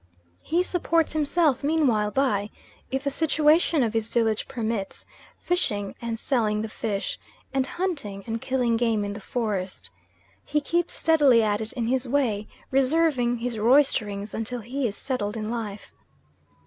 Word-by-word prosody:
He 345 +3 +1
supports 335 -3 +1
himself 305 -2 +2
meanwhile 275 -9 +2
by, 210 -4 +1 0.4
if 265 +1 -2
the 280 - 0
situation 310 0 +3
of 225 -2 -1
his 225 -1 0
village 225 -2 0
permits, 225 -6 -3 0.3
fishing 205 - -1
and 230 -1 -3
selling 220 -4 0
the 220 - -4
fish, 215 -3 -3 0.3
and 265 -1 +1
hunting 280 - -3
and 225 0 -3
killing 245 -3 +1
game 225 -3 +1
in 200 - -3
the 205 - -8
forest. 190 - -3 0.5
He 300 - 0
keeps 345 +3 -1
steadily 290 -8 +4
at 210 0 +1
it 220 - -5
in 240 -3 -2
his 255 +2 0
way, 235 -6 0 0.2
reserving 265 -3 +2
his 235 -1 -3
roysterings 215 -4 +2
until 230 +2 -4
he 255 +4 -2
is 205 - -6
settled 230 -5 -3
in 215 0 -3
life. 215 -4 -5
240 Hz, 150 wpm, -25 LUFS, 215-280 Hz, 0.5 s, steadily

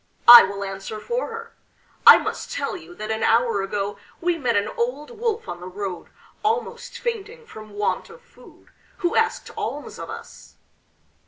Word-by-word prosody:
I 240 0 +13
will 200 +1 -3
answer 195 +2 -6
for 480 - -3
her. 460 0 -8 0.5
I - - +12
must - - -5
tell - - -3
you 355 -1 -11
that 215 -5 -5
an 220 0 -2
hour 230 -3 +2
ago 200 +1 -3 0.2
we 350 0 +1
met 250 -7 -1
an 205 +1 +1
old 255 - -3
wolf 460 -1 -3
on 175 - -6
the 180 - -9
road, 190 -1 -6 0.4
almost 470 +2 -2
fainting 465 0 -5
from 215 - -11
want 205 0 -2
of - - -13
food, 485 - -19 0.4
who 345 - +1
asked 450 0 0
alms - - -5
of - - -7
us. - - -11
245 Hz, 170 wpm, -23 LUFS, -, 0.5 s, I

